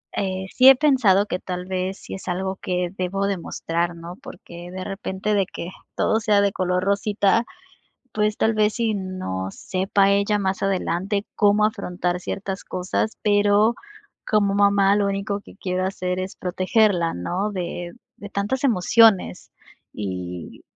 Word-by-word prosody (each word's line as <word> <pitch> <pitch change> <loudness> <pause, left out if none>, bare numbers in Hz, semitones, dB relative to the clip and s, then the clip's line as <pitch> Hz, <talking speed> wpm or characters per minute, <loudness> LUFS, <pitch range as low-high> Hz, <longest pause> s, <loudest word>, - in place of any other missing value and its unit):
Eh, 190 -1 -2
sí 260 +1 +8
he 270 - +9
pensado, 250 -9 +4
que 180 -3 -3
tal 180 -1 -5
vez, 185 0 -3
sí - - -10
es 190 - -8
algo, 190 +1 -2
que 180 -1 -1
debo 190 +2 -1
de 200 -1 -1
mostrar, 170 +1 -2
¿no? 170 +1 -9
Porque, 175 +1 -10
de 185 0 -5
repente, 195 +1 -3
de 200 -2 +2
que, 170 - -6 0.3
todo 220 - +2
sea 215 -2 +3
de 200 0 +2
color 180 0 0
rosita, 200 +2 +2 0.7
pues, 210 0 0
tal 220 - +2
vez, 215 0 +2
sí, 230 -2 0
no 185 - -4
sepa 195 - +1
ella 200 +1 +2
más 190 -1 -2
adelante, 195 +1 -1
cómo 205 0 +4
afrontar 180 -4 -2
ciertas 195 +1 -5
cosas. 185 +4 -2
Pero, 205 +2 +3 0.5
como 205 -2 +2
mamá, 200 -1 +4
lo 205 -1 +2
único 200 +1 -2
que 200 - -16
quiero 185 -1 -2
hacer, 185 -1 -3
es 185 +1 -4
protegerla, 185 -1 +1
¿no?, 185 - -2
de 175 -2 -4 0.2
de 205 - -9
tantas 205 +7 -2
emociones. 225 -3 +3 0.4
Y 90 -4 -6
195 Hz, 155 wpm, -23 LUFS, 180-205 Hz, 0.7 s, he